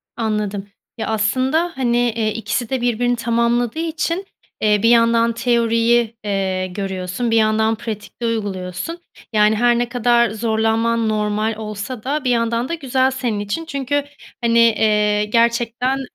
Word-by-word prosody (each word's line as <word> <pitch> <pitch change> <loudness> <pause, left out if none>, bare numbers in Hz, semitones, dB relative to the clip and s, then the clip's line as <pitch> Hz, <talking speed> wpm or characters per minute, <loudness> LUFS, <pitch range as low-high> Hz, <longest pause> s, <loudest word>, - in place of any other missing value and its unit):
Anladım. 210 -3 -2 0.3
Ya, 225 - -3
aslında, 260 +10 +1
hani, 240 -3 +1
eee, 230 -3 0
ikisi 225 +1 -3
de 260 -2 -1
birbirini 245 0 +1
tamamladığı 235 +2 0
için, 330 +3 -2 0.4
eee, 210 -1 +3
bir 230 - +5
yandan 230 0 +4
teoriyi, 235 -1 +2
eee, 190 -2 -1
görüyorsun, 190 +4 -3
bir 225 - +3
yandan 215 0 +3
bir 220 - +2
yandan 220 +1 +2
pratikte 220 -1 -6
uyguluyorsun. 205 - -3 0.4
Yani, 210 0 +4
her 240 +1 +3
ne 240 0 -1
kadar 240 -1 +3
zorlanman 225 +1 0
normal 215 +1 0
olsa 215 +2 -6
da, 285 +2 -2
bir 255 - 0
yandan 235 +1 0
da - - -2
güzel 265 -4 +1
senin 245 -5 -2
için 205 +11 -3
çünkü, 280 -1 -1 0.4
hani, 235 0 +3
eee, 210 -2 +3
gerçekten, 235 +3 +1
230 Hz, 150 wpm, -19 LUFS, 215-245 Hz, 0.4 s, bir